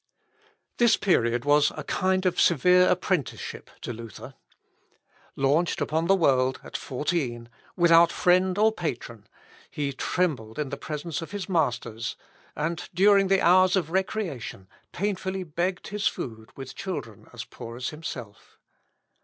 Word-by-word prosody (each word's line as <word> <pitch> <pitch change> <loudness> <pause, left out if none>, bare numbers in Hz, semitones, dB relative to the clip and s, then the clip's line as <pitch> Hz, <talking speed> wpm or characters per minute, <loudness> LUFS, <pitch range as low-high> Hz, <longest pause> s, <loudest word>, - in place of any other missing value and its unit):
This 240 -2 +4
period 120 - +1
was 145 0 +4
a - - -4
kind 185 0 0
of 180 -1 +2
severe 180 +3 +5
apprenticeship 180 - -2
to - - -5
Luther. 115 0 -10 1.0
Launched 145 +6 +1
upon 160 +2 0
the 195 - +5
world 130 -7 +2
at - - -11
fourteen, 130 -5 -2 0.3
without 170 -1 +6
friend 185 +1 +2
or 220 +1 +4
patron, 120 - -5 0.4
he 140 -2 -3
trembled 130 -8 -2
in 150 -3 -3
presence 150 +3 -4
of 165 - -7
his 205 -2 -5
masters, 125 - -1 0.4
and, 155 +3 -3
during 200 +1 +5
the 195 0 +3
hours 185 +2 +5
of 170 -4 -1
recreation, 180 - -3 0.2
painfully 190 -1 -2
begged 175 +3 -3
his 210 0 0
food 110 -3 -5
with 135 -1 -8
children 180 - -6
as - - -7
poor 115 +1 -9
as 125 - -3
himself. 125 -9 -9
165 Hz, 135 wpm, -26 LUFS, 130-185 Hz, 1.0 s, without